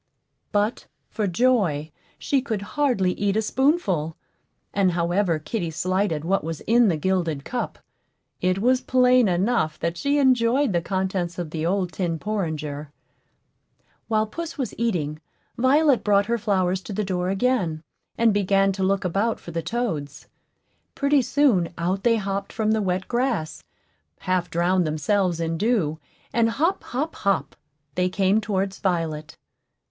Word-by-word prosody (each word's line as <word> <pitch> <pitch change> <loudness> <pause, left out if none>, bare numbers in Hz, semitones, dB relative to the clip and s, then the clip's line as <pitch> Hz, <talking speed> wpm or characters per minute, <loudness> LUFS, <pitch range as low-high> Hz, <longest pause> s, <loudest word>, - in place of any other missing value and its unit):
But, 210 +2 0 0.2
for 215 -3 -1
joy, 180 - +1 0.3
she 275 -2 0
could 220 -6 -3
hardly 250 -11 +2
eat 205 0 0
a - - +3
spoonful; 210 - +1 0.6
and 190 -3 +2
however 175 0 +1
kitty 170 +3 -3
slighted 180 -1 -1
what 195 0 +1
was 165 -1 -5
in 235 +1 +4
the 170 -5 +1
gilded 165 -4 -1
cup, 245 - -3 0.6
it 185 +1 +1
was 250 +5 +2
plain 250 -2 +4
enough 180 -3 +1
that 170 0 -2
she 285 +6 +1
enjoyed 260 -2 +3
the 170 - +1
contents 185 -2 -2
of 170 -3 -4
the 160 0 -2
old 185 -1 0
tin 175 -4 -1
porringer. 155 -7 -3 1.2
While 215 -1 +2
puss 330 +9 -6
was 260 -6 -3
eating, 160 -10 -1 0.3
Violet 275 +2 +3
brought 200 -1 +3
her 235 +1 0
flowers 190 -3 +1
to 205 - -7
the 210 - -1
door 180 -2 -1
again, 190 -7 0 0.3
and 230 -2 +4
began 195 -1 +3
to 190 0 -3
look 195 0 +1
about 200 +6 0
for 170 - -9
the 165 0 -2
toads. 160 - -3 0.7
Pretty 280 0 +3
soon 240 - +2
out 185 +3 -1
they 230 +2 +3
hopped 195 -1 -3
from 220 -1 0
the 220 0 +2
wet 185 -1 -1
grass, 235 - -1 0.6
half 185 -1 0
drowned 175 +1 +1
themselves 170 +3 0
in 165 0 -2
dew, 190 -9 +1 0.3
and 230 -1 +3
hop, 320 +11 0
hop, 295 +6 -3
hop 200 -1 0 0.4
they 180 0 +1
came 195 +3 +2
towards 195 -2 -2
Violet. 160 -5 -2
195 Hz, 150 wpm, -24 LUFS, 170-230 Hz, 1.2 s, in